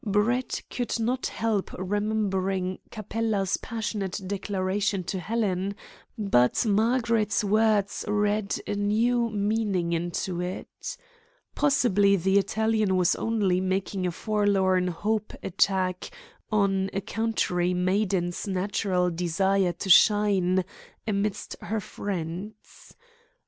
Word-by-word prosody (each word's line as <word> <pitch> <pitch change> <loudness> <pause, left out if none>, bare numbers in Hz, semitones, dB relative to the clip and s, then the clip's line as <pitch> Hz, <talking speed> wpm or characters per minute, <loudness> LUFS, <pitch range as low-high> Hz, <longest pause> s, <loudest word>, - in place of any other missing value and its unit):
Brett 220 +5 0
could 245 -1 -2
not 245 +3 0
help 220 -4 -1
remembering 195 -2 -1
Capella's 215 -3 -1
passionate 215 -4 -3
declaration 195 0 -1
to 190 +2 -3
Helen, 200 -2 -1 0.4
but 195 - +2
Margaret's 225 0 +2
words 210 -1 +2
read 210 0 0
a - - -2
new 230 +4 +1
meaning 205 -4 0
into 175 +2 -2
it. 180 +1 -6 0.6
Possibly 230 -9 +3
the 190 +2 +3
Italian 215 -1 +1
was 180 -1 +3
only 200 -5 +1
making 190 0 -1
a - - -1
forlorn 195 -2 +1
hope 210 +5 -2
attack 185 0 0 0.4
on 195 -2 +2
a 195 - -1
country 190 -4 0
maiden's 185 -1 0
natural 185 -1 0
desire 180 +2 +1
to - - -6
shine 190 -2 +5 0.4
amidst 205 -1 -2
her 220 +1 -2
friends. 195 +1 -6
200 Hz, 100 wpm, -26 LUFS, 185-215 Hz, 0.6 s, shine